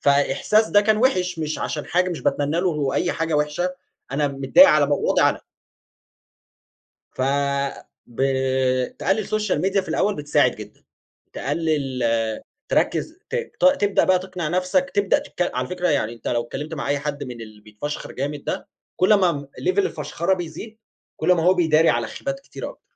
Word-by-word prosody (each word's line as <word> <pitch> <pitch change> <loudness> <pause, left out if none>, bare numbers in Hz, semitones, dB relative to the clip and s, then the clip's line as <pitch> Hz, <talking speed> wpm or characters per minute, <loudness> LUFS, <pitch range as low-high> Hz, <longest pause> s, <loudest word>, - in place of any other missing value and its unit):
فإحساس 145 +10 +2
ده 205 - +5
كان 215 +1 +2
وحِش، 185 -8 +1
مش 155 -1 -3
عشان 150 - -3
حاجة، 180 +1 +1
مش 170 - -4
باتمني 145 +4 0
له 185 - +1
هو 145 -4 -1
أي 180 - +1
حاجة 165 -1 -2
وحشة، 150 +5 0 0.4
أنا 145 +1 +1
متضايق 140 - +6
على 150 -2 +4
مو 145 - +1
وضعي - - +3
أنا. - - -7 1.7
ف - - -7 0.9
ب 120 - -10 0.8
تقلّل 200 +2 0
social 215 -3 0
media 195 +1 +2
في - - -12
الأول 205 0 +1
بتساعد 145 0 +2
جدًا. - - -11 0.5
تقلّل 145 -3 -2 0.7
تركّز 330 +3 0
ت - - -4 0.3
ت - - +1 0.2
تبدأ 205 -1 +3
بقى 185 -1 +4
تقنع 185 -3 -5
نفسك 185 - 0
تبدأ 200 -1 +3
تتك 180 - -3
على 125 0 -2
فكرة 180 0 -1
يعني 135 -7 +1
أنت 115 - -7
لو 120 -1 0
اتكلّمت 145 +7 -6
مع 135 - -4
أي 145 - +1
حد 145 0 -4
من 125 -2 -8
اللي 110 -2 -11
بيتفشخر 105 +8 -6
جامد 145 +2 -4
ده، - - -4 0.3
كل 185 +4 +4
ما 185 -4 +3
م 145 -2 -5 0.2
level 370 +2 0
الفَشْخَرة 190 - 0
بيزيد، 180 +5 -8 0.4
كل 180 - +2
ما 170 -2 +2
هو 180 +3 +5
بيداري 160 -2 +3
على 120 -1 0
خيبات 275 0 -5
كتيرة - - -8
أكتر. - - -17
165 Hz, 175 wpm, -22 LUFS, 145-190 Hz, 1.7 s, متضايق